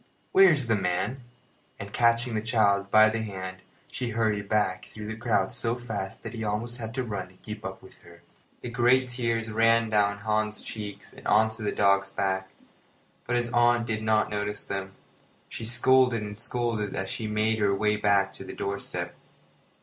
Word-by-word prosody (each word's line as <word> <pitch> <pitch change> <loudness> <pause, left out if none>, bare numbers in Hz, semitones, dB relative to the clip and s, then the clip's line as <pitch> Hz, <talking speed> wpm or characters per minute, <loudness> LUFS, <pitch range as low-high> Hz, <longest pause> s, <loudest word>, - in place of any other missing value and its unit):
Where 195 0 +7
is 145 -5 +1
the 115 -1 +2
man?" 95 +7 -1 0.6
And, 100 0 -8
catching 115 0 +2
the 110 - 0
child 105 -4 +2
by 110 +1 +7
the 115 +1 -2
hand, 95 -3 -6 0.3
she 125 -2 -4
hurried 105 -3 -1
back 105 -4 +1
through 105 -1 -9
the 110 +1 -4
crowd 110 -4 0
so 115 0 0
fast 110 -6 -6
that - - -6
he 115 -1 -5
almost 115 +3 -2
had 115 0 -6
to 130 - -1
run 100 -5 -4
to 90 - -21
keep 105 +2 -9
up 95 -2 -7
with 95 - -15
her. 85 0 -17 0.4
The 120 - -6
great 125 +2 +3
tears 115 -2 -1
ran 115 0 +3
down 100 -1 +2
Hans's 105 0 -1
cheeks 105 -2 -7
and - - -9
on 110 +1 +4
to 110 0 -5
the 105 - -1
dog's 100 -1 +3
back, 95 -1 -2 0.8
but 120 - 0
his 120 0 -1
aunt 120 0 +4
did 110 -1 -2
not 110 -1 +2
notice 105 0 -2
them. 95 0 -4 0.6
She 115 - -6
scolded 125 -1 +4
and 105 0 -7
scolded 115 -3 -1
as 95 - -3
she 110 +3 -4
made 110 +1 0
her 100 -1 +2
way 105 +1 +1
back 100 -2 +2
to - - -9
the - - -8
doorstep. 100 0 -4
110 Hz, 190 wpm, -27 LUFS, 100-115 Hz, 0.8 s, Where